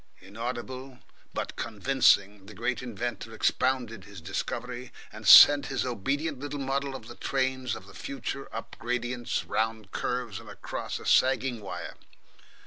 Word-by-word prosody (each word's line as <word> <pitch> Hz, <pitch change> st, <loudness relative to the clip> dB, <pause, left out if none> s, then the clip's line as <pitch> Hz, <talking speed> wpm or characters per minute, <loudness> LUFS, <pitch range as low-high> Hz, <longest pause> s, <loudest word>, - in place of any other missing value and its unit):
Inaudible, 125 Hz, +6 st, -6 dB, 0.3 s
but -, -, -4 dB
convincing, 105 Hz, -4 st, +2 dB
the 105 Hz, -, -11 dB
great 120 Hz, +3 st, -1 dB
inventor 115 Hz, -2 st, -5 dB
expounded 120 Hz, -5 st, 0 dB
his 100 Hz, -2 st, -10 dB
discovery, 120 Hz, +8 st, -4 dB, 0.2 s
and -, -, -7 dB
sent 145 Hz, -1 st, +10 dB
his 135 Hz, -, -1 dB
obedient 135 Hz, +6 st, -2 dB
little 145 Hz, +1 st, -5 dB
model 135 Hz, 0 st, -1 dB
of 115 Hz, -4 st, -9 dB
the 120 Hz, -, -8 dB
trains 130 Hz, -3 st, -1 dB
of 95 Hz, -, -10 dB
the 95 Hz, -, -14 dB
future 135 Hz, +2 st, -5 dB
up 115 Hz, -, -7 dB
gradients, 120 Hz, 0 st, -2 dB
round 110 Hz, -2 st, -1 dB
curves, 125 Hz, -5 st, -2 dB
and -, -, -12 dB
across -, -, -5 dB
a -, -, -11 dB
sagging 130 Hz, -3 st, +3 dB
wire. 90 Hz, -3 st, -6 dB
120 Hz, 140 wpm, -28 LUFS, 110-130 Hz, 0.3 s, sent